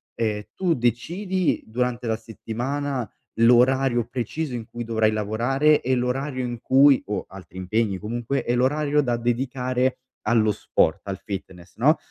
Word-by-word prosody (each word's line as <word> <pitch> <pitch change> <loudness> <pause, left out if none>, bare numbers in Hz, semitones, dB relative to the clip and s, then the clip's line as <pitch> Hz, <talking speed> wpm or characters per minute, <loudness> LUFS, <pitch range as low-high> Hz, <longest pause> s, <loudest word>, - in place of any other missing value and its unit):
ehm, 105 -2 -1
tu 180 -3 +1
decidi 170 - 0
durante 125 +2 -2
la 110 - +1
settimana 120 +3 -4 0.3
l'orario 125 +1 +4
preciso 130 +4 -3
in 120 -2 -4
cui 120 - -5
dovrai 110 -1 +2
lavorare 120 +8 +2
e 130 +1 +1
l'orario 130 +1 -1
in 120 -1 -5
cui 135 +1 +5
o 100 -2 -3
altri 95 0 -12
impegni 100 +2 0
comunque, 120 +6 -3
e 120 - +1
l'orario 145 +4 +2
da 120 -4 0
dedicare 125 +1 0 0.3
allo 110 -1 +4
sport, 80 -4 +1
al 95 -1 -3
fitness, 90 -3 -7
no, 145 +8 +4
120 Hz, 145 wpm, -24 LUFS, 110-135 Hz, 0.3 s, cui